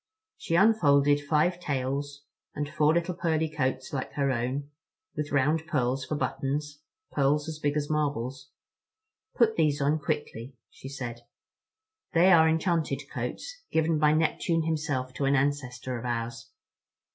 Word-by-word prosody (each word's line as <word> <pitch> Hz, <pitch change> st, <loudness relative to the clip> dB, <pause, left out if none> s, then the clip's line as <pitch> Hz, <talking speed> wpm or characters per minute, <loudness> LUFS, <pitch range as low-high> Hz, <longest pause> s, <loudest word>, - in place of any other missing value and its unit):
She 165 Hz, -, -2 dB
unfolded 145 Hz, -8 st, +4 dB
five 155 Hz, +5 st, +1 dB
tails, 140 Hz, -1 st, -3 dB, 0.3 s
and 145 Hz, 0 st, -2 dB
four 150 Hz, +1 st, +2 dB
little 170 Hz, +1 st, 0 dB
pearly 160 Hz, -2 st, 0 dB
coats 130 Hz, -4 st, -2 dB
like 130 Hz, -2 st, -3 dB
her 140 Hz, -1 st, +1 dB
own, 130 Hz, +4 st, -2 dB, 0.4 s
with 150 Hz, -1 st, -3 dB
round 150 Hz, +4 st, +1 dB
pearls 130 Hz, -3 st, 0 dB
for 155 Hz, -, -3 dB
buttons, 145 Hz, +1 st, -2 dB, 0.3 s
pearls 145 Hz, +1 st, +1 dB
as 155 Hz, -1 st, -6 dB
big 145 Hz, 0 st, 0 dB
as 145 Hz, -1 st, -1 dB
marbles. 135 Hz, -4 st, -2 dB, 0.9 s
"Put 225 Hz, -3 st, +3 dB
these 150 Hz, -3 st, +2 dB
on 145 Hz, +2 st, +1 dB
quickly," 145 Hz, -5 st, -4 dB, 0.2 s
she 135 Hz, -, -10 dB
said, 125 Hz, -4 st, -6 dB, 0.9 s
"they 180 Hz, +2 st, +5 dB
are 160 Hz, -2 st, +6 dB
enchanted 160 Hz, -4 st, -1 dB
coats, 325 Hz, -, -5 dB
given 160 Hz, -1 st, +2 dB
by 150 Hz, 0 st, +4 dB
Neptune 165 Hz, +1 st, +1 dB
himself 150 Hz, -5 st, -2 dB
to 140 Hz, -, -2 dB
an 135 Hz, +1 st, +3 dB
ancestor 130 Hz, -3 st, -1 dB
of 120 Hz, -, -8 dB
ours. 115 Hz, -1 st, -4 dB
145 Hz, 145 wpm, -28 LUFS, 135-160 Hz, 0.9 s, are